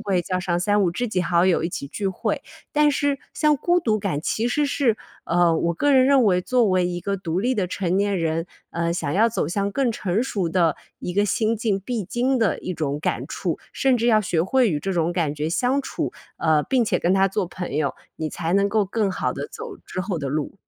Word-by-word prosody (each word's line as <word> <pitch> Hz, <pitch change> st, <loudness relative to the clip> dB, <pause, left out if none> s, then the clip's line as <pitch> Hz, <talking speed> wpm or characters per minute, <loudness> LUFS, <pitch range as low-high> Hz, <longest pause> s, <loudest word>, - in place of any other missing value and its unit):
会 195 Hz, -4 st, 0 dB
叫 185 Hz, +2 st, -2 dB
上 175 Hz, -1 st, -1 dB
三 205 Hz, +2 st, +2 dB
五 175 Hz, -, +2 dB
知 245 Hz, +5 st, -2 dB
己 185 Hz, -4 st, 0 dB
好 175 Hz, 0 st, +2 dB
友 175 Hz, -3 st, +3 dB
一 -, -, 0 dB
起 140 Hz, -, -5 dB
聚 200 Hz, +7 st, -3 dB
会。 190 Hz, -, -2 dB, 0.3 s
但 300 Hz, 0 st, +4 dB
是 285 Hz, -1 st, 0 dB, 0.2 s
像 300 Hz, -1 st, +3 dB
孤 350 Hz, +5 st, +2 dB
独 215 Hz, -7 st, +1 dB
感 185 Hz, -8 st, -2 dB
其 220 Hz, +7 st, -1 dB
实 290 Hz, +4 st, +1 dB
是， 270 Hz, -6 st, +1 dB, 0.3 s
呃， 170 Hz, -1 st, +3 dB
我 170 Hz, +1 st, 0 dB
个 290 Hz, -, +1 dB
人 260 Hz, -1 st, +6 dB
认 275 Hz, -2 st, +5 dB
为 180 Hz, -3 st, +3 dB
作 245 Hz, +5 st, +2 dB
为 185 Hz, -1 st, +2 dB
一 175 Hz, 0 st, -3 dB
个 200 Hz, +2 st, -2 dB
独 180 Hz, -1 st, -2 dB
立 255 Hz, +4 st, +1 dB
的 190 Hz, -, +1 dB
成 180 Hz, 0 st, -1 dB
年 200 Hz, -1 st, +1 dB
人， 165 Hz, +1 st, -1 dB, 0.2 s
呃， 170 Hz, 0 st, -1 dB
想 160 Hz, -4 st, -2 dB
要 225 Hz, +4 st, +4 dB
走 225 Hz, -, -2 dB
向 200 Hz, +2 st, -1 dB
更 265 Hz, -1 st, +1 dB
成 205 Hz, 0 st, -1 dB
熟 195 Hz, -9 st, -1 dB
的 165 Hz, -2 st, +2 dB, 0.2 s
一 180 Hz, -, -4 dB
个 205 Hz, +2 st, +2 dB
心 220 Hz, +2 st, +1 dB
境 210 Hz, -4 st, 0 dB
必 225 Hz, -1 st, -3 dB
经 255 Hz, +6 st, 0 dB
的 225 Hz, -5 st, +1 dB
一 185 Hz, -, -4 dB
种 150 Hz, -3 st, -2 dB
感 -, -, -1 dB
触。 -, -, -3 dB
甚 265 Hz, -2 st, +2 dB
至 235 Hz, +1 st, 0 dB
要 215 Hz, -2 st, +5 dB
学 175 Hz, -5 st, 0 dB
会 245 Hz, +3 st, +3 dB
与 150 Hz, -, 0 dB
这 195 Hz, +5 st, -3 dB
种 170 Hz, 0 st, +1 dB
感 160 Hz, -5 st, 0 dB
觉 150 Hz, +2 st, -2 dB
相 255 Hz, +9 st, +1 dB
处， -, -, -3 dB, 0.2 s
呃， 155 Hz, -2 st, +2 dB
并 250 Hz, -, +1 dB
且 -, -, +1 dB
跟 175 Hz, -, +2 dB
它 195 Hz, 0 st, +4 dB
做 195 Hz, -1 st, -1 dB
朋 180 Hz, -5 st, -6 dB
友， 155 Hz, -, 0 dB, 0.2 s
你 155 Hz, -1 st, -3 dB
才 170 Hz, 0 st, -3 dB
能 200 Hz, +1 st, +3 dB
够 215 Hz, -1 st, +2 dB
更 205 Hz, +1 st, 0 dB
好 -, -, -1 dB
地 -, -, -5 dB
走 445 Hz, -2 st, -8 dB
之 185 Hz, -, -5 dB
后 185 Hz, -3 st, -2 dB
的 140 Hz, -, -3 dB
路。 150 Hz, +4 st, -2 dB
195 Hz, 260 characters per minute, -23 LUFS, 170-235 Hz, 0.3 s, 人